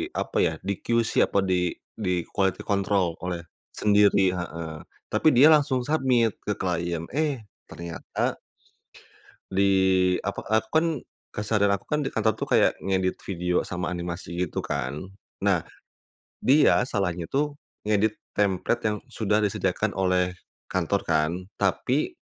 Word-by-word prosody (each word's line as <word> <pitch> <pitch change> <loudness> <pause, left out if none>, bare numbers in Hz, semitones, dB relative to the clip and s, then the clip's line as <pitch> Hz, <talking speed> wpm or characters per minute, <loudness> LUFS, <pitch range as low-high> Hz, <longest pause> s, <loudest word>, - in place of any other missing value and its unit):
apa - - -1
ya, 80 - +2
di 100 +1 -1
QC 115 -1 +2
atau 100 - +1
di 90 -2 +1 0.2
di 90 -5 -1
quality 95 -2 0
control 100 -4 +1
oleh 90 -2 -3 0.3
sendiri 100 -2 +4
heeh, 85 -2 -5 0.4
tapi 110 +8 +2
dia 135 +5 +8
langsung 140 -4 +3
submit 130 -7 +2 0.2
ke 105 - 0
klien, 85 -2 -1
eh 145 -7 0 0.2
ternyata 85 -1 -4 1.2
di 100 +1 +3 0.5
apa, - - -3
aku 110 +1 +1
kan 160 +1 +3 0.5
keseharian 105 -1 +2
aku 100 - -10
kan 150 - 0
di 135 - -1
kantor 110 0 +1
tuh - - -3
kayak - - +4
ngedit 95 -1 -1
video 90 -1 -1
sama 90 0 -3
animasi 85 -1 -5
gitu - - -4
kan, 70 +8 -3 0.3
nah - - +2 0.8
dia 135 -2 +5
salahnya 95 -8 -2
tuh 145 +1 -1 0.3
ngedit 105 +1 +3 0.2
template 100 +3 +1
yang 105 -1 +1
sudah 105 -1 0
disediakan 100 0 0
oleh 90 -1 +1 0.3
kantor - - 0
kan, 75 +2 +1 0.2
tapi, 125 - 0
100 Hz, 135 wpm, -26 LUFS, 90-110 Hz, 1.2 s, dia